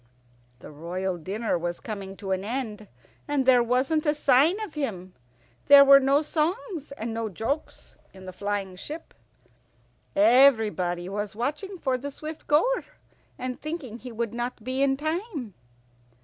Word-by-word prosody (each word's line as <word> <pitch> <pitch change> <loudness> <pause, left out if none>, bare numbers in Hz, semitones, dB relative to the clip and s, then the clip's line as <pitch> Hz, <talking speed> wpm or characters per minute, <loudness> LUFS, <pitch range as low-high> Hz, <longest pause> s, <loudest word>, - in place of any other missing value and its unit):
The - - -11
royal 175 +4 -4
dinner 200 +3 -2
was 175 +1 -3
coming 195 -3 -7
to 195 -2 -5
an 190 0 0
end, 215 -2 -4 0.4
and 285 -2 0
there 250 -2 +6
wasn't 260 +6 +1
a 295 - +3
sign 295 +7 +4
of 415 -7 -6
him. 190 - -4 0.5
There 280 0 +9
were 275 0 +9
no 275 +3 +3
songs 320 - -2
and 230 -4 -5
no 225 -1 -3
jokes 225 - -5
in 190 -1 -13
the 185 - -8
flying 200 -1 -3
ship. 310 - -8 1.0
Everybody 210 -7 +4
was 205 +1 -4
watching 300 - -3
for 260 -6 -1
the 285 +3 -5
Swift 305 +2 -8
goer, 480 +13 +3 0.5
and 255 0 -5
thinking 300 -8 -6
he 250 0 -9
would 230 -1 -3
not 240 -1 -4
be 260 +3 -2
in 270 -1 +2
time. 310 - -4
250 Hz, 150 wpm, -26 LUFS, 205-290 Hz, 1.0 s, There